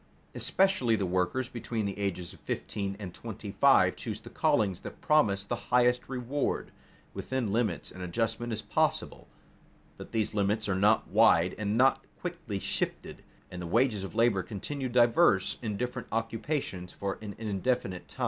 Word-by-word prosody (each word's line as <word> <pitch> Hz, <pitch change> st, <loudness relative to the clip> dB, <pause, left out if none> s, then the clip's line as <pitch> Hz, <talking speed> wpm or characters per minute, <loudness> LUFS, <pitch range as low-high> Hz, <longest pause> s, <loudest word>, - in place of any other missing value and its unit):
Especially 190 Hz, -12 st, +2 dB
the 100 Hz, -3 st, -1 dB
workers 90 Hz, +8 st, 0 dB
between 115 Hz, -3 st, -3 dB
the 100 Hz, 0 st, -4 dB
ages 90 Hz, -3 st, -3 dB
of -, -, -16 dB
fifteen 100 Hz, -1 st, -3 dB
and 95 Hz, -4 st, -7 dB
twenty -, -, -7 dB
five -, -, +5 dB
choose -, -, -5 dB
the -, -, -12 dB
callings 95 Hz, -4 st, +2 dB
that -, -, -9 dB
promise 110 Hz, -12 st, +3 dB
the 110 Hz, +4 st, -2 dB
highest 125 Hz, 0 st, +3 dB
reward. 130 Hz, +2 st, -2 dB, 0.4 s
Within 125 Hz, -6 st, -2 dB
limits 115 Hz, -1 st, -1 dB
an 90 Hz, -, -10 dB
adjustment 115 Hz, +6 st, -2 dB
is 110 Hz, 0 st, -3 dB
possible, -, -, 0 dB, 0.7 s
but -, -, -10 dB
these 110 Hz, -1 st, 0 dB
limits 105 Hz, +1 st, 0 dB
are 100 Hz, -, +1 dB
not 105 Hz, +4 st, +3 dB
wide 85 Hz, +2 st, +4 dB
and 105 Hz, +1 st, 0 dB
not 135 Hz, +1 st, +4 dB, 0.2 s
quickly 170 Hz, -, -4 dB
shifted, -, -, -3 dB, 0.3 s
and 90 Hz, -1 st, -6 dB
the 85 Hz, -, -5 dB
wages 115 Hz, 0 st, +2 dB
of 95 Hz, -, -7 dB
labor 115 Hz, -4 st, +3 dB
continue 130 Hz, +8 st, -4 dB
diverse 120 Hz, -, +4 dB
in 105 Hz, -4 st, -3 dB
different 125 Hz, +1 st, -3 dB
occupations 115 Hz, -, -2 dB
for 100 Hz, -1 st, -4 dB
an 105 Hz, -2 st, -7 dB
indefinite 105 Hz, -2 st, -2 dB
time. -, -, -12 dB
110 Hz, 160 wpm, -29 LUFS, 100-125 Hz, 0.7 s, five